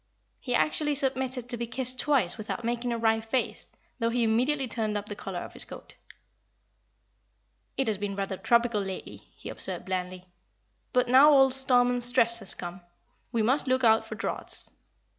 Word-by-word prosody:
He 250 -2 -2
actually 300 +1 +1
submitted 260 -2 0
to 245 - -3
be 235 0 -4
kissed 255 +1 -2
twice 265 -12 +2
without 220 +2 -5
making 240 +1 -2
a 235 - -1
wry 225 -1 +2
face, 225 +3 -3 0.3
though 230 -1 +1
he 240 0 0
immediately 255 +5 +1
turned 215 -2 -2
up 205 - -5
the 205 - -7
collar 190 -3 -6
of - - -9
his - - -6
coat. - - -12 1.8
"It 270 - +1
has 210 -3 -1
been 200 -1 -3
rather 195 0 -3
tropical 235 -1 +2
lately," 190 -1 -6 0.2
he - - -9
observed, - - -5
blandly, 185 -1 -4 0.7
"but 250 -1 +2
now 265 +4 +7
old 270 -3 +5
'Storm 250 -2 +3
and 245 0 -2
Stress' 235 -1 +3
has 195 - +3
come, 175 +1 -7 0.5
we 230 -3 0
must 260 +6 +2
look 260 0 +1
out 225 -1 +5
for - - -8
draughts." - - -3
235 Hz, 180 wpm, -27 LUFS, 215-255 Hz, 1.8 s, now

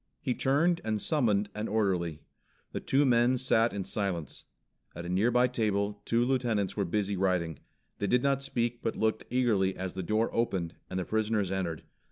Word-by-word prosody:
He 125 - -1
turned 165 +8 +2
and 110 -1 -1
summoned 105 -8 +1
an 105 +1 -3
orderly. 90 -7 0 0.5
The - - -3
two 140 +2 +2
men 120 0 +4
sat 120 -2 +2
in 100 -1 -3
silence. 95 -6 -3 0.5
At 85 - -6
a - - -5
nearby 120 +7 +3
table 105 -4 -1
two 120 +1 +2
lieutenants 120 -7 0
were 100 - 0
busy 100 +2 -1
writing. 90 -5 0 0.4
They 100 - 0
did 125 +5 +2
not 140 -1 +2
speak 120 -3 -2
but 115 - -2
looked 110 0 0
eagerly 110 -7 +2
as 95 -1 -4
the 95 - -4
door 110 +5 0
opened, 95 -7 -1 0.2
and 95 - -4
the 90 - -1
prisoners 110 -3 0
entered. 90 -4 -2
105 Hz, 180 wpm, -30 LUFS, 95-120 Hz, 0.5 s, men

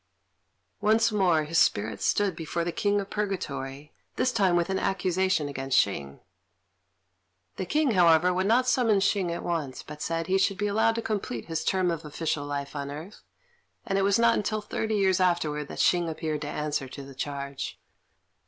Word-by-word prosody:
Once 220 +2 +3
more 180 -7 +3
his 160 +2 +1
spirit 105 +2 +1
stood 200 -4 +1
before 165 +1 -3
the 175 - -2
King 205 +3 +1
of 200 0 -6
Purgatory, 145 -9 -4 0.2
this 255 - +1
time 195 -7 +2
with 175 -1 +2
an 190 - 0
accusation 185 -4 0
against 135 -2 -1
Hsing. 70 -9 0 1.4
The 185 - -3
King, 300 - +2
however, 175 -2 +5
would 185 +2 0
not 250 +4 +3
summon 235 -5 +3
Hsing 195 -2 +1
at 170 - -4
once, 155 -7 -3
but 150 0 -10
said 165 0 -2
he 190 +3 +2
should 195 0 +1
be 205 - -1
allowed 220 +2 +2
to 230 - -3
complete 195 - -3
his 160 -1 -3
term 185 -1 +1
of 165 -2 -4
official 150 -1 -3
life 140 0 -4
on 140 -1 -4
earth; 155 +8 -9 0.6
and 195 -4 -1
it 195 - +2
was 200 0 +3
not 230 -2 +3
till 215 +1 -1
thirty 220 +1 -2
years 190 -3 +2
afterwards 155 -5 +1
that - - -7
Hsing 175 -2 +2
appeared 155 -1 -3
to 145 - -4
answer 150 -2 -2
to 140 +2 -9
the 135 0 -11
charge. 140 0 -5
175 Hz, 185 wpm, -27 LUFS, 150-200 Hz, 1.4 s, however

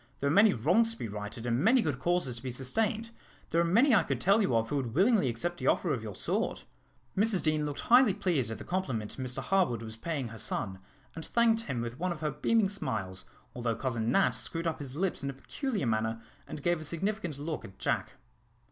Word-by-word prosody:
There - - -2
are 140 - +2
many 205 +4 +7
wrongs 180 - +2
to - - -14
be - - -4
righted, 105 +3 -6
and 120 0 +1
many 255 +4 +5
good 145 -5 -2
causes 175 -5 0
to - - -8
be 130 - -4
sustained. 220 - -1 0.4
There 170 - +3
are - - +3
many 230 +11 +4
I 215 - +6
could - - -2
tell 200 +4 +4
you 130 - +1
of 115 0 +1
who 145 - 0
would 125 -4 -3
willingly 195 - +4
accept 175 +10 -3
the - - -2
offer 170 - +2
of 125 - -2
your 105 -3 -7
sword." - - -2 0.5
Mrs 205 -1 +3
Deane 155 -1 +1
looked 145 - -4
highly 245 -4 +5
pleased 175 - 0
at 110 - -4
the - - -8
compliment 130 - -3
Mr 130 -1 -3
Harwood 175 - +1
was 110 0 -7
paying 135 0 -3
her 110 0 -8
son, 95 -2 -2 0.3
and 160 - -7
thanked 230 +2 +3
him 125 -4 -2
with 120 +2 -5
one 180 +1 0
of 165 -3 -5
her 155 -1 0
beaming 200 +9 +2
smiles, 95 - -3 0.3
although 120 -2 -1
Cousin 120 -3 -1
Nat 195 - +4
screwed 165 -1 -4
up 165 -1 -1
his 135 -2 -6
lips 185 0 -1
in 140 - -2
a - - -4
peculiar 220 - -3
manner 110 0 0 0.3
and 145 - -7
gave 175 -2 +1
a - - -6
significant 170 0 -3
look 150 +2 -4
at 95 - -12
Jack. - - -1
150 Hz, 230 wpm, -30 LUFS, 120-195 Hz, 0.5 s, many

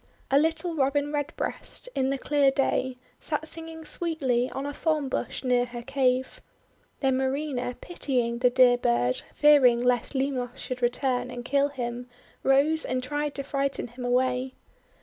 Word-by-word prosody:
A 275 - +6
little 325 +3 0
Robin 285 0 0
Redbreast, 295 - -3
in 265 0 0
the 275 - 0
clear 285 0 +3
day, 260 -1 0 0.2
sat 310 0 -2
singing 325 0 -7
sweetly 270 -8 0
on 270 - -5
a 285 - -4
thorn 305 -3 0
bush - - -3
near 250 -1 +2
her 240 -1 -8
cave. 260 -1 0 0.6
Then 265 -2 +2
Marina, 265 -2 -2
pitying 245 -8 -1
the 250 0 +4
dear 245 -1 +5
bird, 120 - +1
fearing 280 -5 +6
lest 245 +1 +1
Limos 265 -2 -2
should 255 -2 -5
return 250 0 0
and 245 -1 -7
kill 280 +2 +2
him, 245 -2 -5 0.3
rose 285 +4 +3
and 255 0 -2
tried 290 +2 -2
to 275 - -1
frighten 275 -2 -2
him 245 +2 -9
away. 255 +1 0
265 Hz, 155 wpm, -27 LUFS, 250-290 Hz, 0.6 s, A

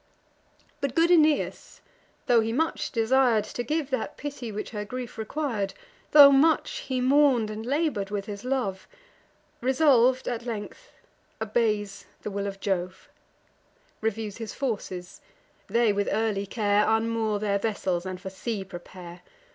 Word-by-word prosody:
But 280 -3 -2
good 335 +1 +4
Aeneas, 310 -3 +2 0.5
tho' 240 -1 +5
he 225 0 0
much 320 +7 -1
desir'd 230 -1 +3
To 240 - -5
give 290 +3 -2
that 265 +3 -2
pity 280 -6 -6
which 210 +1 -5
her 210 -2 -4
grief 250 +2 -6
requir'd; 220 -3 -3 0.3
Tho' 285 -2 +9
much 300 +3 +3
he 260 -1 0
mourn'd, 255 -4 +3
and 215 +1 -6
labour'd 270 -6 -1
with 205 -1 -3
his 205 -1 -7
love, 245 -8 -2 0.7
Resolv'd 260 -1 +3
at 240 -1 -3
length, 230 - -6 0.5
obeys 210 -3 -1 0.2
the 210 - -4
will 200 0 -3
of 195 0 -6
Jove; 185 -2 -3 0.9
Reviews 220 -2 -3
his 225 -3 -6
forces: 195 -8 -4 0.5
they 230 -3 +2
with 200 0 -1
early 210 -3 0
care 205 0 +2
Unmoor 225 -1 +1
their 200 -1 0
vessels, 190 -5 -1
and 185 -1 -5
for 190 +1 -7
sea 205 +1 -4
prepare. 175 -1 -10
225 Hz, 140 wpm, -26 LUFS, 200-260 Hz, 0.9 s, Tho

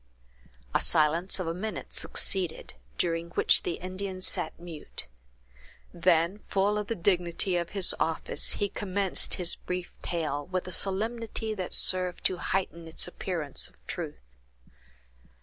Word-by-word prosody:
A - - +4
silence 165 +5 +3
of 185 - -1
a 165 - -1
minute 210 +5 -4
succeeded, 180 -4 0 0.2
during 170 -1 0
which - - +6
the 175 - -1
Indian 185 +2 -4
sat 165 -3 0
mute; 170 -3 -7 0.9
then, 175 +2 +3
full 205 +2 +2
of 210 - -3
the 230 - -1
dignity 180 0 +2
of 170 -1 0
his 190 - +4
office, 160 0 +1
he 205 - 0
commenced 200 -1 0
his 175 -2 +2
brief 180 -1 -4
tale, 150 -4 -1
with 185 0 -2
a - - -5
solemnity 220 +3 -1
that 185 -4 -3
served 185 -1 +2
to 185 - +2
heighten 170 -2 -1
its 160 - 0
appearance 170 -5 -2
of - - -27
truth. - - -6
180 Hz, 140 wpm, -29 LUFS, 170-195 Hz, 0.9 s, which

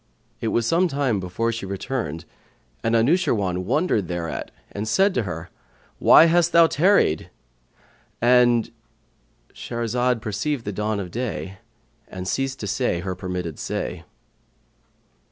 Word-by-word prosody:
It - - -3
was 115 +1 +1
some 170 +8 +3
time 135 - 0
before 95 +6 -2
she 115 -4 -5
returned 95 - -4 0.6
and 115 0 +1
Anushirwan 115 - +1
wondered 130 - +1
thereat 85 -1 -4 0.2
and 105 +2 -4
said 195 - +3
to - - +1
her, 80 +2 -7 0.5
"Why - - +8
hast 170 +1 +3
thou 170 0 +7
tarried?"—And 120 - 0 0.8
Shahrazad 120 +1 -1
perceived 115 +6 -3
the 105 - -3
dawn 105 +1 -1
of 90 -3 -6
day 105 -4 -4 0.5
and 95 0 -7
ceased 135 +5 -2
to 105 - -4
say 95 -3 0
her 95 0 -3
permitted 90 -4 -5
say. - - -4
110 Hz, 125 wpm, -23 LUFS, 95-130 Hz, 0.8 s, Why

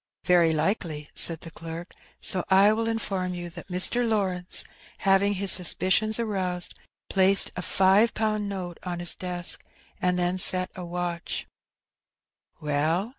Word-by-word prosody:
Very 175 -2 +4
likely," 155 -2 -2
said 165 -2 +2
the 165 - -9
clerk, 165 +1 -8 0.3
"so 185 -2 +2
I 195 +2 +5
will 225 +1 -1
inform 195 -5 -2
you 175 -1 -6
that - - -10
Mr. 185 +7 +1
Lawrence, 190 -6 +1 0.3
having 195 +1 +2
his 195 0 +3
suspicions 190 +4 +2
aroused, 185 -5 -2 0.3
placed 195 0 +3
a 180 - -4
five 195 +5 +3
pound 215 -2 -1
note 180 -3 -6
on 180 -1 -4
his 175 0 +3
desk, 180 -1 -3 0.4
and 180 0 +1
then 180 +1 0
set 185 0 +4
a 185 - -8
watch 175 0 -4 1.1
^" - - -34
"Well?" 155 +7 0
185 Hz, 145 wpm, -26 LUFS, 175-200 Hz, 1.1 s, I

